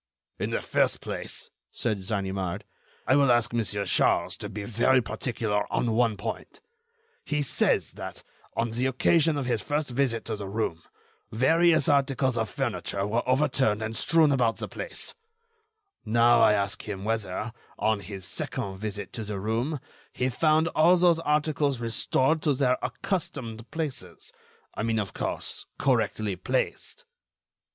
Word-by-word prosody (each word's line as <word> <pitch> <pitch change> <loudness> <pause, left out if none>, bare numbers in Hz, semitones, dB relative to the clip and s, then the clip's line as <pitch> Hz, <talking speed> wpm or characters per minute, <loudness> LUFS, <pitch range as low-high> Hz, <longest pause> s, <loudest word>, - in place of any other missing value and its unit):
"In - - -1
the - - -2
first - - +1
place," - - -6 0.2
said 110 -4 -1
Ganimard, 95 -3 -2 0.4
"I 130 - +4
will 140 -3 +5
ask 120 -1 +2
Monsieur 105 -3 -1
Charles 90 - +2
to - - -6
be 105 +1 -5
very 120 +5 +3
particular 115 -4 -2
on 120 - +1
one 115 -2 +2
point: 110 - -6 0.6
He 150 -1 -1
says 135 - +1
that, - - -8 0.3
on 115 0 0
the 125 +3 0
occasion 155 +4 +3
of 140 - -2
his 120 -3 0
first 145 -2 -2
visit 120 -3 0
to 110 - -2
the 100 -1 -6
room, 100 -5 -2 0.5
various 160 +7 +4
articles 135 -3 +2
of 110 -2 -1
furniture 100 +1 -2
were 115 +4 +1
overturned 130 -5 +2
and 110 +1 -4
strewn 160 +4 +4
about 120 -4 +2
the - - -4
place; - - -7 0.9
now, 115 +1 +4
I 105 - +6
ask 100 -1 -1
him 95 -2 -4
whether, 110 0 -2 0.2
on 110 -1 +1
his 100 -2 -8
second 130 -9 -4
visit 105 -2 -5
to 110 - -4
the 105 -2 -4
room, 115 +9 -1 0.3
he 130 +1 0
found 155 +5 +3
all 170 +3 +5
those 170 -2 +4
articles 150 -3 +1
restored 130 +6 +1
to 145 -3 +2
their 130 -1 +2
accustomed 125 - -3
places—I 155 -8 -7
mean, 115 +1 0
of 105 -3 -2
course, - - -3
correctly 110 -6 +1
placed." 130 - -2
120 Hz, 150 wpm, -27 LUFS, 105-140 Hz, 0.9 s, I